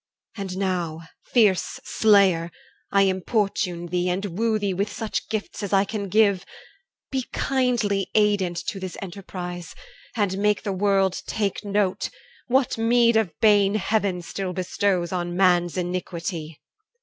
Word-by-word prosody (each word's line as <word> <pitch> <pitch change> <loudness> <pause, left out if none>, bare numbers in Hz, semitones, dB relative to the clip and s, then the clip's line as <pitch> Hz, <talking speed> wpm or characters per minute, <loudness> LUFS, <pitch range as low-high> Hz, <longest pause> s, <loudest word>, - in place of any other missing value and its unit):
And 195 -3 -5
now, 175 -4 -1 0.3
fierce 210 -7 +3
slayer, 195 -6 +4 0.4
I 200 0 +5
importune 190 -2 0
thee, 180 +1 -1
And 185 0 -2
woo 225 -1 +2
thee 200 -2 -1
with 200 +3 -1
such 220 -2 -4
gifts 215 0 -4
as 200 -1 -4
I 195 0 +4
can 200 -1 -4
give, 200 -2 +3 0.7
Be 260 -2 -2
kindly 240 -7 0
aidant 205 -5 +2
to 195 - -5
this 185 -1 -6
enterprise, 180 -2 -7 0.4
And 200 -4 0
make 210 0 +2
the 200 -3 -2
world 195 -1 +1
take 205 -1 -2
note, 200 -2 0 0.4
what 260 -2 +1
meed 235 0 +4
of 205 -8 0
bane 205 -2 +5
Heaven 200 -3 0
still 185 +1 -4
bestows 185 -1 0
on 175 -1 -2
man's 180 -2 +3
iniquity. 170 -3 -4
195 Hz, 135 wpm, -24 LUFS, 180-210 Hz, 0.7 s, I